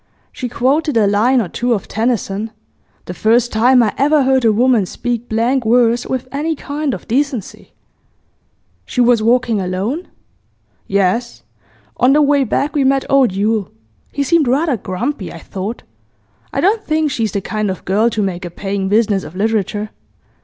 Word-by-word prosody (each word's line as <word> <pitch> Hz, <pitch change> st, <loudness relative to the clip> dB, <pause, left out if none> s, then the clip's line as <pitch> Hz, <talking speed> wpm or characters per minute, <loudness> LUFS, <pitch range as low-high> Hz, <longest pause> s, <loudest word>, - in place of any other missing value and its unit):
She 250 Hz, -, -5 dB
quoted 275 Hz, +4 st, +1 dB
a 215 Hz, -, +4 dB
line 220 Hz, +6 st, +3 dB
or 220 Hz, -, -1 dB
two 240 Hz, +7 st, -1 dB
of 205 Hz, -, -3 dB
Tennyson; 220 Hz, -2 st, -1 dB, 0.6 s
the -, -, -6 dB
first 235 Hz, +2 st, +2 dB
time 245 Hz, +3 st, +4 dB
I 215 Hz, -, 0 dB
ever 290 Hz, +1 st, +3 dB
heard 260 Hz, -1 st, +2 dB
a 225 Hz, -, +4 dB
woman 230 Hz, -2 st, +2 dB
speak 240 Hz, +3 st, -4 dB
blank 240 Hz, +4 st, +1 dB
verse 235 Hz, +1 st, +2 dB
with 260 Hz, -1 st, -3 dB
any 310 Hz, +3 st, -2 dB
kind 285 Hz, -1 st, -3 dB
of -, -, -12 dB
decency.' 255 Hz, -3 st, -2 dB, 1.2 s
'She -, -, -4 dB
was 240 Hz, -2 st, +4 dB
walking 230 Hz, -2 st, +2 dB
alone?' 195 Hz, -, -3 dB, 0.8 s
'Yes. 200 Hz, +5 st, 0 dB, 0.5 s
On 255 Hz, +2 st, +4 dB
the 300 Hz, -, +4 dB
way 285 Hz, -1 st, +3 dB
back 280 Hz, +4 st, -1 dB
we 285 Hz, -, +2 dB
met 270 Hz, 0 st, +2 dB
old 270 Hz, -5 st, +4 dB
Yule; 205 Hz, +1 st, -1 dB, 0.4 s
he 285 Hz, -, -1 dB
seemed 320 Hz, -1 st, +2 dB
rather 280 Hz, +3 st, +1 dB
grumpy, 205 Hz, +2 st, -4 dB
I -, -, -9 dB
thought. 195 Hz, +7 st, -6 dB, 0.7 s
I -, -, -1 dB
don't 420 Hz, +3 st, +2 dB
think 310 Hz, -1 st, 0 dB
she's 225 Hz, -6 st, -2 dB
the 200 Hz, -, 0 dB
kind 215 Hz, +1 st, -2 dB
of 190 Hz, -, -5 dB
girl 210 Hz, +5 st, +2 dB
to 220 Hz, -2 st, -1 dB
make 185 Hz, -2 st, -3 dB
a 175 Hz, -, -5 dB
paying 195 Hz, +2 st, -3 dB
business 210 Hz, -2 st, +2 dB
of 165 Hz, -, -10 dB
literature. 210 Hz, 0 st, -1 dB
235 Hz, 170 wpm, -17 LUFS, 205-265 Hz, 1.2 s, a